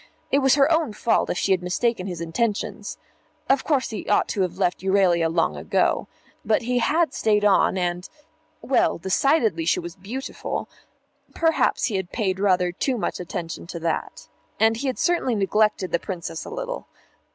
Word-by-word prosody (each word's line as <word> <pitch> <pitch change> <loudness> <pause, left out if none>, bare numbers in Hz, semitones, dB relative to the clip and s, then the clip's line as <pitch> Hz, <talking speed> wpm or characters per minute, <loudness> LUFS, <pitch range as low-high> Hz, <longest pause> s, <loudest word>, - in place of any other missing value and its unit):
It 280 - +4
was 270 -1 +4
her 280 +2 +4
own 320 -8 +1
fault 225 +2 +1
if - - -1
she 195 - 0
had 185 -2 +3
mistaken 185 +2 -1
his 175 -3 -5
intentions. 205 +6 -2 0.5
Of 270 -1 +3
course 275 -7 0
he 215 - -6
ought 205 - +3
to 200 - -1
have 180 -1 -1
left 185 -2 0
Euralia 185 -4 +2
long 165 - +1
ago. 75 - 0 0.4
But 220 +2 +1
he 245 +1 0
had 315 +2 +2
stayed 210 -1 +2
on, 195 -1 +4
and 175 0 -2 0.5
well, 270 - +2
decidedly 205 - +1
she 165 - +2
was 170 -1 -7
beautiful 220 +8 -5 0.7
perhaps 325 -1 +2
he 210 -6 -1
had 190 -2 -5
paid 190 -4 -1
rather 180 -3 +2
too 250 +8 -1
much - - -3
attention 170 -1 -6
to 170 - -6
that. 165 -1 -3 0.3
And 225 0 +4
he 275 +4 -3
had 260 - -2
certainly 340 -9 +1
neglected 210 -1 +1
the 170 - +1
Princess 170 -3 -6
a - - -7
little. - - -5
200 Hz, 175 wpm, -24 LUFS, 180-255 Hz, 0.7 s, It